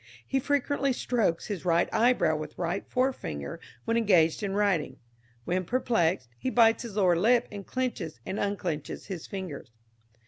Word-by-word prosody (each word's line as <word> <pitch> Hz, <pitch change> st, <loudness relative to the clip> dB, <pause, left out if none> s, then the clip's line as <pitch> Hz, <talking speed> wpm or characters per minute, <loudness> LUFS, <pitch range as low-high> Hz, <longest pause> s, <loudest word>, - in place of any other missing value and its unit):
He 270 Hz, -, 0 dB
frequently 280 Hz, 0 st, +1 dB
strokes 225 Hz, -9 st, 0 dB
his 200 Hz, -6 st, -4 dB
right 170 Hz, -1 st, +3 dB
eyebrow 220 Hz, -9 st, +3 dB
with 155 Hz, 0 st, -6 dB
right 175 Hz, +2 st, -2 dB
forefinger 80 Hz, -, -2 dB, 0.3 s
when 230 Hz, -, +1 dB
engaged 180 Hz, -8 st, +3 dB
in 200 Hz, -2 st, -2 dB
writing; 200 Hz, -6 st, +1 dB, 0.5 s
when 185 Hz, +1 st, 0 dB
perplexed, 185 Hz, -, +1 dB
he -, -, -1 dB
bites 230 Hz, -2 st, +4 dB
his 230 Hz, -5 st, -7 dB
lower 185 Hz, -4 st, +4 dB
lip 230 Hz, +7 st, +3 dB
and 200 Hz, -2 st, -8 dB
clenches 220 Hz, -, -3 dB
and 195 Hz, -, -3 dB
unclenches 180 Hz, -7 st, -3 dB
his 185 Hz, -5 st, -6 dB
fingers." 185 Hz, -, -6 dB
200 Hz, 150 wpm, -28 LUFS, 170-240 Hz, 0.5 s, bites